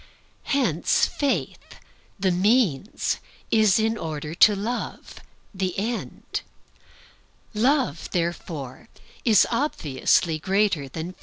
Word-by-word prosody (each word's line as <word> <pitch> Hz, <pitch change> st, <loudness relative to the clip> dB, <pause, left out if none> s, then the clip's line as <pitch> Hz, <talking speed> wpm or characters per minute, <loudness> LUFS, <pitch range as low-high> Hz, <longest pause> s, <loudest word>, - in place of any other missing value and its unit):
Hence 235 Hz, -, +2 dB
Faith, 240 Hz, -, -2 dB, 0.4 s
the 190 Hz, -1 st, +2 dB
means, 200 Hz, -, +1 dB, 0.3 s
is 215 Hz, -4 st, +4 dB
in 225 Hz, 0 st, 0 dB
order 155 Hz, -1 st, -5 dB
to 205 Hz, +4 st, +6 dB
Love, 225 Hz, +5 st, -5 dB, 0.3 s
the 185 Hz, -2 st, -2 dB
end. 225 Hz, +4 st, -4 dB, 1.1 s
Love, 245 Hz, -, +1 dB
therefore, 165 Hz, -6 st, -4 dB, 0.6 s
obviously 170 Hz, -, +1 dB
is -, -, -26 dB
greater 190 Hz, -7 st, +1 dB
than 165 Hz, +6 st, -6 dB
faith. -, -, -30 dB
190 Hz, 95 wpm, -24 LUFS, 160-225 Hz, 1.1 s, to